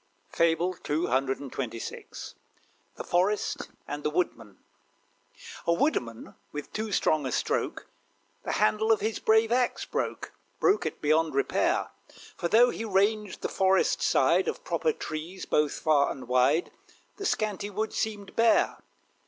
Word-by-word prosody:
FABLE 170 +2 +2
CCXXVI. 135 -5 -3 0.6
THE - - -6
FOREST 190 +4 0 0.2
AND 145 +1 -5
THE - - +1
WOODMAN. 150 - -2 1.1
A 170 - +4
Woodman, 120 - -1 0.2
with 150 -1 -7
too 220 0 -3
strong 155 -7 +1
a - - -3
stroke, - - -1 0.6
The - - -3
handle 215 +1 +2
of 220 - +3
his 220 +1 -1
brave 220 +1 +3
axe 250 0 +1
broke, - - -3 0.3
Broke 405 +1 +3
it - - -7
beyond 155 0 +2
repair; 140 - +1 0.4
For, 170 - -2
though 235 +6 +5
he - - -5
ranged 210 0 0
the - - +1
Forest 190 0 +2
side, - - +3
Of - - -3
proper 475 - 0
trees 170 - -6
both 150 -1 +1
far 150 -3 +2
and 130 - -7
wide 130 +7 +2 0.5
The 400 - -5
scanty 205 -2 -1
wood 215 +2 -3
seemed 205 -3 -3
bare. 230 0 +3
180 Hz, 135 wpm, -28 LUFS, 150-215 Hz, 1.1 s, though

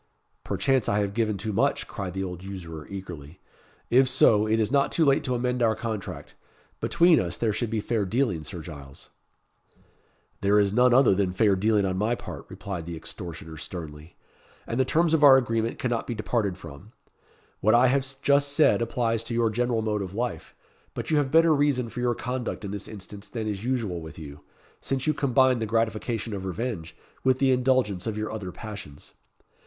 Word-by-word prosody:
"Perchance 110 +6 +1
I 100 - +1
have 100 -1 0
given 110 -2 0
too 105 +2 -4
much," - - +1
cried 95 -2 -6
the 95 - -2
old 90 -1 -6
usurer, 85 -6 -8
eagerly; 90 -5 -8 0.5
"if 130 +2 +5
so, 105 -3 +4
it 110 +1 +2
is 110 +1 0
not 140 -1 +2
too 165 - +2
late 140 -1 +3
to 125 - 0
amend 125 0 -1
our 110 -2 +3
contract. 110 -3 -5 0.5
Between 170 -2 +4
us, 85 -2 -3
there 110 -3 0
should 120 +1 -2
be 110 -1 -1
fair 110 0 0
dealing, 105 - 0
Sir 80 +2 -7
Giles." 70 -4 -11 1.3
"There 100 +1 +4
is 100 -1 +2
none 125 +2 +5
other 125 -3 +6
than 95 -1 0
fair 100 +1 +3
dealing 105 +1 +2
on 95 -1 -1
my 110 +4 +1
part," - - -9
replied 90 -5 -6
the 85 - -5
extortioner 80 -1 -8
sternly; 80 -1 -8 0.5
"and 115 - -3
the 130 - +3
terms 165 +4 +2
of 155 -2 +3
our 135 -2 +9
agreement 115 -2 -1
cannot 120 -2 -2
be 120 - -3
departed 105 -3 -1
from. 85 +6 -12 0.7
What 110 +3 +4
I 120 +2 +6
have 135 +2 +3 0.2
just 140 0 +3
said 150 -5 +4
applies 115 -1 0
to 115 - -4
your 115 -1 +2
general 120 0 0
mode 105 -1 -1
of 95 0 -6
life; 120 0 -4 0.4
but - - -4
you 155 - +3
have 145 -2 +1
better 165 +2 +5
reason 140 -5 +1
for 115 - -7
your 120 -1 +1
conduct 125 -3 -4
in 100 - -5
this 100 - -5
instance 100 0 -10
than 115 -1 -4
is 105 -1 -3
usual 115 -9 -2
with 80 -2 -10
you, 75 -2 -9 0.4
since 135 -1 -2
you 155 - +2
combine 130 -3 +3
the 110 - -2
gratification 115 0 -1
of 95 -2 -4
revenge 95 -2 -4 0.3
with 130 -1 +3
the 135 0 +3
indulgence 125 -7 +1
of 110 -1 -3
your 110 0 -3
other 105 -4 -5
passions. 100 -9 -10
110 Hz, 195 wpm, -26 LUFS, 95-125 Hz, 1.3 s, our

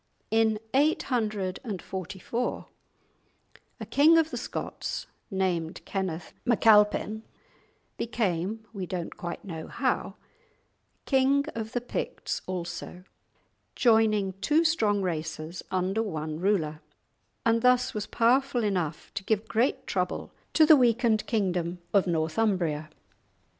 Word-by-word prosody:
In 220 -1 +3 0.2
844 215 - -1 1.1
a 220 - -5
king 290 +9 +5
of 320 -1 +2
the - - -3
Scots, - - -4 0.2
named 180 -4 -1
Kenneth 180 -4 -3
MacAlpin, 215 -2 +4 0.8
became 220 -2 -1
(we 190 -4 -4
don't 175 -2 -4
quite 175 +2 -6
know 165 -4 -6
how) - - -1 0.9
king 275 +1 +3
of 225 -1 -5
the 245 - 0
Picts 245 - -4
also, 180 0 -5 0.7
joining 220 -5 +3
two 310 +3 +3
strong 215 -11 +2
races 160 -1 -4
under 190 +3 0
one 155 -7 -4
ruler, 165 -6 0 0.6
and 230 0 +3
thus 250 +1 +3
was 210 -2 -3
powerful 245 +1 +2
enough 180 -7 -2
to 200 - -4
give 220 +1 0
great 235 +6 +1
trouble - - -2 0.2
to 315 - +6
the 310 - +9
weakened 235 -4 +3
kingdom 180 -5 0 0.2
of 195 -2 +4
Northumbria. 160 -2 0
210 Hz, 110 wpm, -28 LUFS, 180-235 Hz, 1.1 s, the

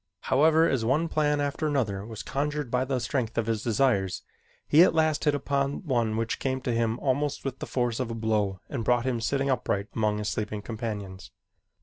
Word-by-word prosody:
However, 160 +4 +5
as 130 -4 0
one 140 +8 +2
plan 150 -2 +1
after 145 +2 -1
another 110 -10 -1
was 110 0 -7
conjured 145 -2 -2
by 125 +1 +1
the 130 -1 -1
strength 120 -1 -2
of 115 - +1
his 110 -2 -1
desires, 110 -5 +1 0.4
he 155 - +6
at 175 - +5
last 155 -1 +2
hit 150 -1 +3
upon 140 +2 -1
one 120 -6 0
which 115 +1 -2
came 130 -1 -1
to 125 - -2
him 115 0 0
almost 140 +2 -1
with 135 -1 -4
the - - -5
force 120 -2 -1
of 125 -3 -2
a 115 - -4
blow 105 -4 0
and 130 -5 -4
brought 120 +1 +2
him 125 -3 -1
sitting 135 +3 0
upright 100 -5 -1
among 105 -1 +1
his 105 0 -3
sleeping 105 -1 -3
companions. 105 -5 -5
125 Hz, 205 wpm, -27 LUFS, 110-140 Hz, 0.4 s, he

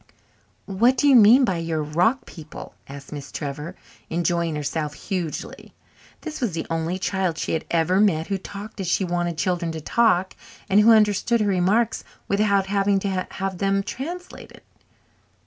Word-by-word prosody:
"What 230 +7 +2
do 290 - +3
you 275 - +6
mean 240 +4 +7
by 190 -7 -1
your 165 -2 -2
rock 175 - +1
people?" 155 -3 -11
asked 140 0 -10
Miss 145 -2 -8
Trevor, 150 +5 -6 0.3
enjoying 170 -1 0
herself 150 0 -3
hugely. 180 -6 -5 0.5
This 310 -3 -7
was 230 -8 -1
the 165 - -3
only 165 +2 -1
child 190 -3 -1
she - - -3
had 160 - -2
ever 170 +3 +2
met 165 -7 +2
who 195 0 -3
talked 200 +3 -9
as 185 - -4
she 185 +3 +1
wanted 175 -1 -2
children 175 0 -1
to 160 - -5
talk 190 +2 +1 0.3
and 195 - +4
who 215 +2 +6
understood 215 +1 +3
her 210 - +1
remarks 200 +4 +1 0.2
without 200 -1 +2
having 200 0 +1
to 190 -2 -2
have 190 -2 -4
them 195 0 +1
translated. 350 - -8
190 Hz, 165 wpm, -23 LUFS, 165-210 Hz, 0.5 s, mean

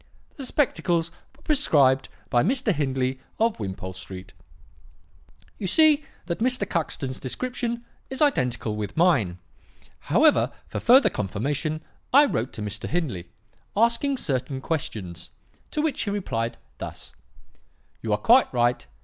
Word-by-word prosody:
"'The 270 -3 -4
spectacles 170 - +1 0.2
were 295 - -24
prescribed 140 - +3 0.2
by 120 - +4
Mr. 245 - +2
Hindley 130 -3 -1 0.2
of 225 0 +1
Wimpole 95 -2 -5
Street.' 95 0 -9 1.3
"You 195 - -2
see 305 - +5 0.2
that 170 - -3
Mr. 255 +3 +2
Cuxton's 135 -5 -2
description 235 - -3 0.2
is 265 - -3
identical 125 - +1
with 105 +3 -5
mine. 130 - +3 0.7
However, - - +4
for - - -5
further 260 +4 +6
confirmation, 145 - -2 0.3
I 285 +3 +7
wrote 125 - -1
to 105 - -5
Mr. 105 0 -5
Hindley, 125 - -2 0.5
asking 235 +5 +3
certain 130 - -1
questions, 100 - -4 0.4
to 300 - -1
which 315 -3 0
he 205 - -1
replied 120 - -2 0.2
thus: - - -8 0.9
"'You 110 - -3
are 105 - +3
quite 240 - +5
right. 120 - +1
150 Hz, 130 wpm, -25 LUFS, -, 1.3 s, I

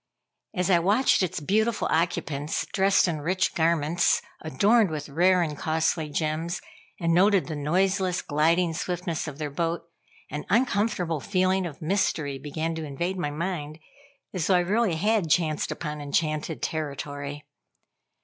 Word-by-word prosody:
As 180 +1 +1
I 175 - +5
watched 205 +10 +3
its 185 -1 -1
beautiful 215 +8 +1
occupants 160 -3 -1
dressed 195 -1 +4
in 160 -3 -2
rich 185 +5 0
garments, 165 0 +2 0.2
adorned 200 - +3
with 150 -2 -4
rare 180 +4 +3
and 150 -3 -3
costly 160 +1 0
gems, 160 +4 -2 0.4
and 165 -2 +1
noted 195 +2 +4
the 160 - -5
noiseless, 185 +5 +1
gliding 165 +3 +2
swiftness 175 -1 -3
of 145 -3 -7
their 150 -2 -4
boat, 165 +3 -2 0.5
an 150 - -4
uncomfortable 200 - +1
feeling 185 +2 +1
of 155 -2 -10
mystery 155 -6 0
began 155 +4 -3
to 160 0 -5
invade 170 +6 -3
my 150 - -1
mind, 155 -1 -4 0.6
as 180 -3 -1
though 190 - +4
I 180 - +4
really 200 0 +1
had 205 0 +1
chanced 155 -2 +1
upon 150 -2 -5
enchanted 155 +2 -1
territory. 145 -1 -4
165 Hz, 145 wpm, -26 LUFS, 150-185 Hz, 0.6 s, I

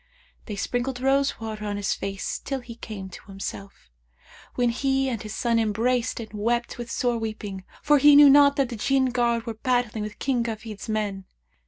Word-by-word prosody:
They 210 - -4
sprinkled 245 +5 -2
rose 275 +2 +1
water 220 -1 -5
on 205 -1 -3
his 200 -1 0
face, 195 0 -4
till 270 -1 -4
he 240 -1 -9
came 215 -4 -8
to 180 - -12
himself, 195 - -8 0.6
when 245 -1 +2
he 270 +2 0
and 235 -5 -2
his 215 -1 -6
son 235 -1 +1
embraced 230 +3 0
and 220 -2 -8
wept 235 +4 -1
with 240 -1 -6
sore 240 0 0
weeping; 210 -3 -5 0.2
for 295 -1 +5
he 290 +1 +7
knew 290 0 +9
not 280 0 +7
that 275 -3 +1
the 240 - -5
Jinn 260 +3 +2
guard 235 -2 +1
were 230 - -3
battling 245 -2 -1
with 210 0 -7
King 255 -4 0
Kafid's 220 -1 -6
men. 205 -3 -2
235 Hz, 190 wpm, -25 LUFS, 215-255 Hz, 0.6 s, knew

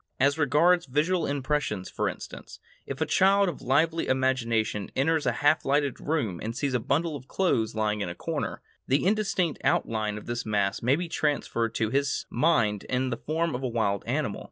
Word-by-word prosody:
As 140 +2 +3
regards 160 +4 +3
visual 155 +6 +1
impressions, 140 -8 -1
for - - -1
instance, - - -9 0.3
if - - -6
a - - +3
child 195 +1 +4
of 175 - -4
lively 160 +5 +1
imagination 115 -6 0
enters 155 +2 +1
a - - +4
half 145 +2 +4
lighted 140 -1 +1
room 130 - -1
and 115 +2 -4
sees 140 -1 -1
a 125 - +2
bundle 155 +7 0
of 130 -2 -9
clothes 115 - 0
lying 105 -1 0
in 95 - -2
a 85 - -6
corner, - - -4 0.2
the 135 +5 +2
indistinct 195 -5 0
outline 110 -2 0
of 105 - -9
this 120 +1 -3
mass 100 -2 0
may 125 +4 +3
be 175 +3 -3
transformed 140 -8 -1
to 110 -1 0
his 140 0 0
mind 115 - +2
into 130 -1 -1
the 115 - -18
form 165 +1 -1
of 125 - -3
a 130 - -1
wild 110 -5 0
animal. - - -1
135 Hz, 190 wpm, -27 LUFS, 115-155 Hz, 0.3 s, child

